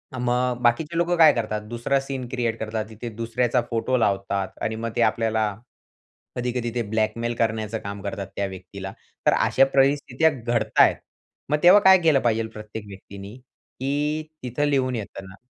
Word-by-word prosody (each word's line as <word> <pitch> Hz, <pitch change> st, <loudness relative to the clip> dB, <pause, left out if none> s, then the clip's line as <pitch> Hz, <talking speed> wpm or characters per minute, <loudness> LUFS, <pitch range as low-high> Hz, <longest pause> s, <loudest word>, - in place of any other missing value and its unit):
मग 125 Hz, 0 st, 0 dB
बाकीचे 145 Hz, +7 st, +1 dB
लोकं 175 Hz, +1 st, +2 dB
काय 155 Hz, -3 st, +7 dB
करतात? 110 Hz, -2 st, -2 dB
दुसरा 120 Hz, +4 st, 0 dB
सीन 135 Hz, -2 st, -5 dB
क्रिएट 120 Hz, -3 st, -1 dB
करतात. 110 Hz, 0 st, -3 dB
तिथे 110 Hz, +2 st, -7 dB
दुसऱ्याचा 120 Hz, +2 st, 0 dB
फोटो 125 Hz, +2 st, 0 dB
लावतात 100 Hz, -3 st, 0 dB
आणि 110 Hz, -, -1 dB
मग 115 Hz, +1 st, -4 dB
ते -, -, +1 dB
आपल्याला 110 Hz, -1 st, -1 dB, 0.8 s
कधी-कधी 125 Hz, -1 st, -2 dB
ते 120 Hz, -, +1 dB
ब्लॅकमेल 115 Hz, +2 st, -1 dB
करण्याचं 110 Hz, -1 st, -1 dB
काम 100 Hz, 0 st, -6 dB
करतात 100 Hz, -1 st, -5 dB
त्या 100 Hz, -, -1 dB
व्यक्तीला. 95 Hz, +1 st, -8 dB, 0.3 s
तर -, -, +5 dB
अशा 135 Hz, -, +4 dB
परिस्थित्या 140 Hz, +2 st, +3 dB
घडतायेत, 120 Hz, -4 st, +2 dB, 0.5 s
मग 150 Hz, -, +2 dB
तेव्हा 180 Hz, +4 st, +8 dB
काय 190 Hz, 0 st, +8 dB
केलं 160 Hz, -4 st, +4 dB
पाहिजेल 115 Hz, -1 st, +1 dB
प्रत्येक 105 Hz, 0 st, -8 dB
व्यक्तीनी? 100 Hz, +2 st, -10 dB
की 145 Hz, +4 st, -4 dB, 0.2 s
तिथं 125 Hz, +4 st, -1 dB
लिहून 130 Hz, -3 st, +1 dB
येत 105 Hz, -3 st, -6 dB
ना, 95 Hz, 0 st, -12 dB
120 Hz, 160 wpm, -24 LUFS, 110-130 Hz, 0.8 s, तेव्हा